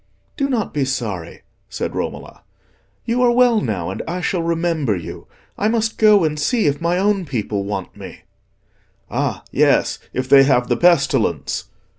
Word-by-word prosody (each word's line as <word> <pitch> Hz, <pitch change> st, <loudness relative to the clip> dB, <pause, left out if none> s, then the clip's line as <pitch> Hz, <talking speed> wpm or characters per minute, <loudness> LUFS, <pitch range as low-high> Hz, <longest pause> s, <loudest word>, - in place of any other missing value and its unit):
"Do 275 Hz, -1 st, -1 dB
not 235 Hz, -6 st, -1 dB
be 145 Hz, -, 0 dB
sorry," 105 Hz, -10 st, -4 dB, 0.3 s
said -, -, -4 dB
Romola, -, -, -5 dB, 0.6 s
"you 240 Hz, +2 st, 0 dB
are 245 Hz, -, +5 dB
well 240 Hz, -2 st, +4 dB
now, 95 Hz, -6 st, -3 dB
and -, -, -5 dB
I 175 Hz, +2 st, -3 dB
shall 180 Hz, 0 st, -1 dB
remember 165 Hz, -8 st, 0 dB
you. 85 Hz, -, -8 dB, 0.3 s
I 210 Hz, -, +1 dB
must 225 Hz, 0 st, -1 dB
go 210 Hz, -3 st, +6 dB
and 150 Hz, -1 st, -1 dB
see 220 Hz, -, +1 dB
if 145 Hz, +1 st, 0 dB
my 170 Hz, +1 st, +1 dB
own 200 Hz, 0 st, +1 dB
people 110 Hz, -, -3 dB
want 100 Hz, -2 st, -5 dB
me." -, -, -11 dB, 0.9 s
"Ah, -, -, -2 dB
yes, -, -, +2 dB
if 130 Hz, 0 st, -3 dB
they 140 Hz, +1 st, +7 dB
have 130 Hz, -3 st, +2 dB
the 120 Hz, -, +1 dB
pestilence!" 170 Hz, -3 st, +1 dB
165 Hz, 165 wpm, -19 LUFS, -, 0.9 s, they